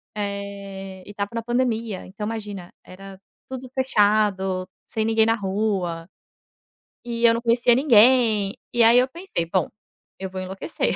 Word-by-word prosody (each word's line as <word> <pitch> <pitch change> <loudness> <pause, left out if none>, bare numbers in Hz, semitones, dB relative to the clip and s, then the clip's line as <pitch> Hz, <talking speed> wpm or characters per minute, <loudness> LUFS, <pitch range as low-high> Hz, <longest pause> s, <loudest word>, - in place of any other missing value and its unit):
eh, 200 -2 -6
e - - -10
estava 200 0 -4
na 230 - -2
pandemia. 230 -4 -1
Então 210 +3 -6
imagina, 205 -5 -6
era 195 +1 -12 0.3
tudo 260 -1 -7
fechado, 205 -6 +1 0.2
sem 220 -1 -2
ninguém 225 0 +3
na 225 - +3
rua 190 -5 -2 1.0
e 235 -1 -4
eu 230 - +6
não 230 - -2
conhecia 240 +1 +3
ninguém, 230 -5 +4 0.2
e 240 - +4
aí 230 +2 +7
eu 250 - +2
pensei: 335 - -4
"Bom, 180 +2 0 0.5
eu 190 0 -5
vou 185 0 -6
enlouquecer". 185 0 -3
210 Hz, 150 wpm, -23 LUFS, 195-235 Hz, 1.0 s, aí